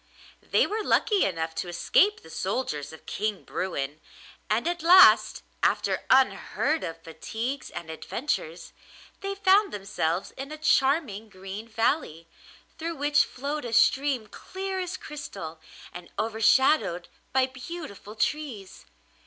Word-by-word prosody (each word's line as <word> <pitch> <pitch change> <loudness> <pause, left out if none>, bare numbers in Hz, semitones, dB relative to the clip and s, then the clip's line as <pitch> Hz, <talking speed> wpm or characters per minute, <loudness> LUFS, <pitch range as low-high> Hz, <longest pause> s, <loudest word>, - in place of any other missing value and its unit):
They - - +2
were 430 +1 -2
lucky 420 -2 +3
enough 165 -3 -2
to 175 - -4
escape 380 - +2
the 160 - -14
soldiers 185 - -3
of 160 - -13
King 210 -1 -3
Bruin, 150 -5 -4 0.5
and 225 +8 +1
at 345 0 -1
last, 365 +3 +7 0.2
after - - +1
unheard 270 +4 +2
of 165 0 -6
fatigues 230 +11 -5
and 170 - -7
adventures, 170 - -4 0.5
they 395 0 -4
found 400 +1 +4
themselves 195 -3 -2
in 275 +2 -8
a 310 - -6
charming 270 -8 +1
green 195 +3 -8
valley, 225 - -1 0.5
through 330 +1 -3
which 290 0 +3
flowed 285 +3 -4
a 235 -2 -5
stream 265 +1 +3
clear 380 - -5
as 365 0 -4
crystal 195 - -8 0.3
and 175 -1 -10
overshadowed 225 - +2 0.2
by 265 -1 +3
beautiful 260 - -9
trees. 230 -6 -3
240 Hz, 130 wpm, -27 LUFS, 185-310 Hz, 0.5 s, last